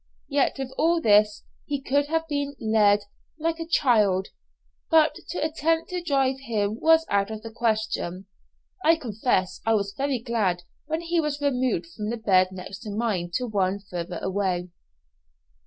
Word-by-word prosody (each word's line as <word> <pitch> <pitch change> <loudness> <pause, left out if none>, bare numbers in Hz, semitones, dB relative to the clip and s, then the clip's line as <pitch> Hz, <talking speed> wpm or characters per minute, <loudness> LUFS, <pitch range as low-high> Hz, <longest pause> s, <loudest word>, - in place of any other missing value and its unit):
Yet - - +2
with 265 -1 -5
all 335 +1 +3
this, 210 -5 +4 0.2
he 285 -1 -1
could 285 +1 +1
have 325 +1 -1
been 285 -1 -2
led 210 -2 +3 0.3
like 325 +1 -1
a 330 - -5
child; 210 - +3 0.6
but 320 -2 +5 0.2
to - - -4
attempt 320 +2 0
to 360 -1 -2
drive 270 -5 +1
him 220 -4 -2
was 325 0 +5
out 200 0 +1
of 215 -1 -6
the 225 - -7
question. 220 -5 -1 0.6
I 325 +2 +6
confess 220 - -1
I 225 0 +3
was 200 -1 -1
very 275 +1 0
glad 215 -7 -1 0.2
when 320 +2 -2
he 340 0 0
was 300 -2 -2
removed 255 -10 0
from 210 0 -4
the 235 - -2
bed 190 -4 +4
next 190 +1 -8
to 220 - -8
mine 205 -5 -1
to 250 - 0
one 195 -4 0
further 180 -3 -6
away. 185 -2 -1
230 Hz, 165 wpm, -25 LUFS, 200-290 Hz, 0.6 s, I